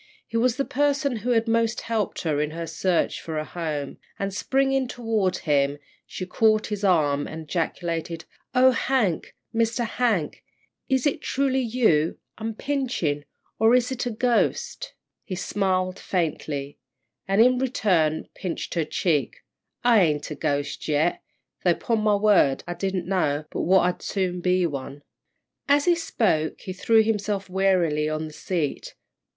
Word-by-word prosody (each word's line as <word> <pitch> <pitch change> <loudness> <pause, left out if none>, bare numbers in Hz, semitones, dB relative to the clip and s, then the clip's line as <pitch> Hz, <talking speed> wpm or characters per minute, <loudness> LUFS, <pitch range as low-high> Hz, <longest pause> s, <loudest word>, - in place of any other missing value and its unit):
He 230 - -10
was 230 +1 +3
the 275 - 0
person 280 -2 +1
who 225 +4 -4
had 230 -1 +2
most 230 0 +1
helped 225 -3 -2
her 150 -3 0
in 150 - -1
her 165 +2 -5
search 170 +2 0
for 160 -1 -5
a 155 - -2
home, 155 -5 -4 0.2
and, 195 0 -3
springing 270 +4 +1
toward 225 -6 -1
him, 140 -2 +1 0.3
she 185 - -5
caught 215 +3 +2
his 210 -1 -4
arm 150 -7 +2
and 160 0 -7
ejaculated: 165 0 -3 0.3
"Oh, 260 +1 +6
Hank! 235 -8 0 0.2
Mr. 230 +1 +1
Hank 220 -9 -1 0.5
is 265 -2 +2
it 290 - +1
truly 270 -1 0
you 220 -11 +2 0.2
I'm 220 0 -4
pinchin', 240 - -1 0.3
or 225 +3 +5
is 250 +1 +2
it 250 -1 -2
a - - 0
ghost?" 240 +1 0 0.3
He 190 - -5
smiled 185 -1 -1
faintly, 150 -5 -3 0.5
and, 195 +1 +1
in 250 +2 +5
return, 190 - +1
pinched 180 -3 -4
her 165 -3 0
cheek. 150 -8 -1 0.4
"I 235 -4 +5
ain't 150 -3 0
a - - -3
ghost 145 -2 -2
yet, 155 +3 +1 0.4
though 175 -2 +4
'pon 230 -2 -1
my 210 -1 +3
word 200 -10 +3
I 175 - -2
didn't 190 -1 -2
know 155 -6 0
but - - -2
what 185 +2 +4
I'd 180 0 0
soon 185 -3 -2
be 180 0 +2
one." 140 -2 -5 0.7
As 285 0 +4
he 350 - +5
spoke, 205 - 0
he 185 - -6
threw 220 +4 +4
himself 210 -2 -1
wearily 175 -6 +2
on 155 0 -2
the 155 - -9
seat. 160 -3 -3
190 Hz, 155 wpm, -25 LUFS, 160-230 Hz, 0.7 s, Oh